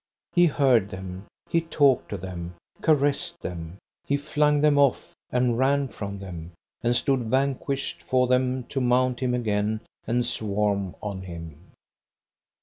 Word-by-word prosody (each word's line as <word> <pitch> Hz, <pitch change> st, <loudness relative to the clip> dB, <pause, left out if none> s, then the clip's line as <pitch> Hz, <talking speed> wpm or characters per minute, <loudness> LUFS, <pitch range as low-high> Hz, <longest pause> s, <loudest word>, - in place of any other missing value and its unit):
He 175 Hz, 0 st, +6 dB
heard 130 Hz, -, +3 dB
them, 95 Hz, +1 st, -7 dB, 0.2 s
he 165 Hz, -, +2 dB
talked 145 Hz, -5 st, +2 dB
to 100 Hz, -, -3 dB
them, 90 Hz, -1 st, -7 dB, 0.3 s
caressed 145 Hz, -2 st, +1 dB
them; 85 Hz, 0 st, -6 dB, 0.3 s
he 140 Hz, -, +2 dB
flung 150 Hz, 0 st, +2 dB
them 150 Hz, -1 st, +4 dB
off, 140 Hz, -3 st, +2 dB, 0.2 s
and 125 Hz, -1 st, +1 dB
ran 140 Hz, +1 st, +2 dB
from 100 Hz, -3 st, -6 dB
them, 90 Hz, -3 st, -8 dB, 0.3 s
and 120 Hz, 0 st, +2 dB
stood 135 Hz, +1 st, +2 dB
vanquished 135 Hz, -6 st, -1 dB
for 125 Hz, +8 st, +2 dB
them 125 Hz, 0 st, +1 dB
to 135 Hz, -, -1 dB
mount 125 Hz, 0 st, +2 dB
him 125 Hz, -1 st, 0 dB
again 110 Hz, -2 st, 0 dB, 0.3 s
and 120 Hz, +1 st, +1 dB
swarm 100 Hz, -4 st, -1 dB
on 100 Hz, -3 st, -4 dB
him. 85 Hz, -2 st, -10 dB
120 Hz, 145 wpm, -26 LUFS, 95-135 Hz, 0.3 s, He